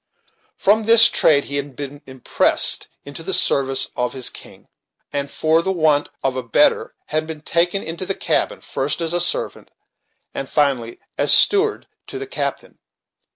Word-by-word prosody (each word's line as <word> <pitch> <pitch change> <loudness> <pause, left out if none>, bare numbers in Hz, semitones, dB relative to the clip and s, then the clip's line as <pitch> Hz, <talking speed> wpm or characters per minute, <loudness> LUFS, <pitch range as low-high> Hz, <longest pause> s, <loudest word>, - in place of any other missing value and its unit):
From 215 +2 +2
this 230 +1 +7
trade 145 -2 +3
he 140 - -4
had 140 -1 -5
been 145 +1 -8
impressed 130 -2 0 0.2
into 140 +3 -7
the 190 +4 -3
service 135 -1 +1
of 125 0 -2
his 130 -2 -3
king, - - -13 0.5
and, 140 0 -3
for 160 +3 +1
the 190 - -2
want 155 -5 +1
of 135 -1 -1
a 130 - -2
better, 145 - +1
had 155 +1 -1
been 160 -2 -8
taken 175 +5 0
into 170 +3 -5
the 195 - -1
cabin, - - -1
first 140 +5 -3
as 165 0 -2
a 175 - +1
servant, 175 - -2 0.6
and 135 - -6
finally 135 -6 -1 0.2
as - - +4
steward 415 +1 +4 0.2
to - - -7
the 405 - -5
captain. 405 - -5
155 Hz, 165 wpm, -19 LUFS, 140-175 Hz, 0.6 s, this